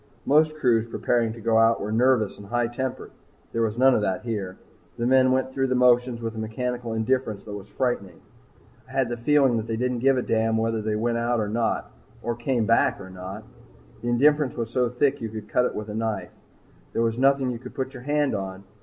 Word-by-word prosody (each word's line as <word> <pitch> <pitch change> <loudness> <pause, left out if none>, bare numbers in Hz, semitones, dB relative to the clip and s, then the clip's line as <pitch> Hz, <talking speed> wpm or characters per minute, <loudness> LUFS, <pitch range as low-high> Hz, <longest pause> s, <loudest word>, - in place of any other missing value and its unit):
Most 155 +2 +3
crews 115 -5 +2
preparing 115 -1 0
to 115 - -11
go 115 0 +2
out 115 0 +4
are 105 - -4
nervous 115 -2 +2
and 100 - -11
high 120 +2 0
tempered. 130 +2 -4 0.4
There 115 - -1
was 110 0 0
none 130 +1 +5
of 110 - +2
that 95 -2 -1
here. 105 -6 -4 0.4
The 120 - -1
men 130 0 +4
went 130 0 0
through 135 0 0
the 130 - 0
motions 125 -1 +3
with 115 -1 -3
a 110 - -6
mechanical 120 +1 -3
indifference 110 -2 -1
that 105 - -7
was 100 0 -8
frightening. 110 -9 -2 0.7
I - - -12
had 130 -3 +1
the 120 - -3
feeling 135 0 +3
that 110 0 -3
they 115 -1 -2
didn't 125 0 -1
give 135 +2 +3
a 125 - 0
damn 110 0 +1
whether 115 0 0
they 105 0 -1
went 115 +2 0
or 115 -2 0
not 115 +1 -1 0.3
or 120 - -1
came 120 -1 0
back 115 -1 +3
or 95 -1 -10
not. 95 +1 -8 0.6
The 120 - -5
indifference 145 +2 +3
was 115 -1 -3
so 125 -1 +1
thick 125 +3 +1
you 115 - -3
could 110 -1 -7
cut 125 - +2
it - - -2
with 105 0 -5
a 105 - -6
knife. 110 -2 -3
Yet - - -31
there 115 - +1
was 115 +1 0
nothing 135 -1 +3
you 120 - -5
could 130 - -11
put 130 -1 -3
your 130 - -9
hand 145 +1 +1
on. 95 -1 -5
120 Hz, 230 wpm, -25 LUFS, 110-130 Hz, 0.7 s, none